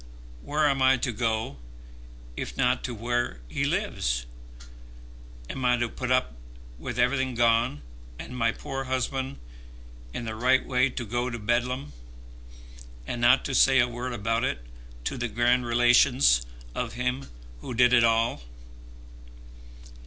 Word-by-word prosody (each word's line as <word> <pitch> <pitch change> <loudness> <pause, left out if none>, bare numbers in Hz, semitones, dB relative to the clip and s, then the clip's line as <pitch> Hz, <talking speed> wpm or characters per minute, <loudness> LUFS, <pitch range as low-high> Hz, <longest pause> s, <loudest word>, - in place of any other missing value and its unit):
Where 150 +1 +1
am 135 -2 +1
I 130 0 +5
to 125 0 -2
go 110 - -2 0.8
if - - -6
not 125 -1 +1
to 125 - -4
where 120 - -2
he - - -2
lives? - - -1 1.2
Am 130 - -5
I 125 0 +3
to 120 0 0
put 125 +2 -5
up 130 - +2 0.5
with 120 - -5
everything 130 +1 +1
gone, 115 - +2 0.3
and 125 - -8
my 115 -2 +2
poor 135 +3 -5
husband 130 +1 -2 0.7
in 115 - -5
the 110 - -4
right 125 +4 +2
way 130 +1 +2
to 120 -1 -5
go 120 +3 -2
to 120 - -5
Bedlam, 120 +5 -1 1.1
and 120 - -4
not 125 +2 +5
to 135 - -3
say 135 +1 +5
a 120 - +4
word 120 +1 -5
about 115 +1 -1
it - - -2 0.4
to 125 - -3
the 120 - -1
grand 120 +2 +1
relations 120 - +4 0.3
of - - -3
him 125 +2 -2 0.3
who 120 - -6
did 125 +1 +5
it 120 -1 +6
all?" 115 - +2
120 Hz, 145 wpm, -27 LUFS, 115-130 Hz, 1.2 s, it